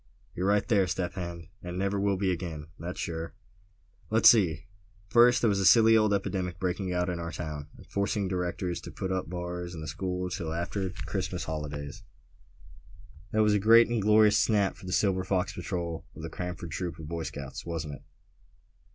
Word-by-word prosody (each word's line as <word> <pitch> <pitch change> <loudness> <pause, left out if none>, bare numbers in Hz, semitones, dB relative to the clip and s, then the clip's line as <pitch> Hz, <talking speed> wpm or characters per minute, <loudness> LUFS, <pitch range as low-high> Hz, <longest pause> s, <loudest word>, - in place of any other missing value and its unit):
"You're 90 +2 -1
right 100 0 +2
there, 100 -5 +3
Step 90 0 -2
Hen; 85 -3 -6
and 90 0 -6
never 100 +1 0
will 100 -1 +1
be 95 -1 +1
again, 80 -4 -4
that's 85 +3 -6
sure!" 80 -2 -4 0.7
"Let's 110 +1 +8
see; 90 -8 +1 0.4
first, 120 +3 +6
there - - +5
was 100 -1 +1
that 95 - +1
silly 115 +3 +7
old 110 -1 +4
epidemic 95 -3 -1
breaking 95 0 -2
out 90 0 0
in 90 -1 -2
our 85 0 -4
town, 75 -2 -5
and - - -14
forcing 100 +1 -1
the 95 - -2
directors 90 -1 -2
to - - -8
put 95 - -4
up 95 -1 -1
the - - -13
bars 90 0 -5
in 80 - -7
the 80 - -6
school 90 +3 -3
till 80 -3 -3
after 95 +3 -2
the 90 - -8
Christmas - - -3
holidays; 75 +1 -5 1.3
that 110 +2 +2
was 105 -1 +4
a 105 - +3
great 115 +3 +6
and 120 -2 0
glorious 105 +1 +5
snap 105 -3 +2
for 95 - -12
the - - -4
Silver 95 -1 +2
Fox 95 0 0
Patrol 85 -2 -4
of 80 - -9
the 80 - -5
Cranford 90 -2 -5
Troop 90 0 -4
of 80 -2 -8
Boy 85 +1 -3
Scouts, 70 -4 -6
wasn't 80 -3 -4
it?" - - -10
90 Hz, 205 wpm, -29 LUFS, 85-100 Hz, 1.3 s, Let's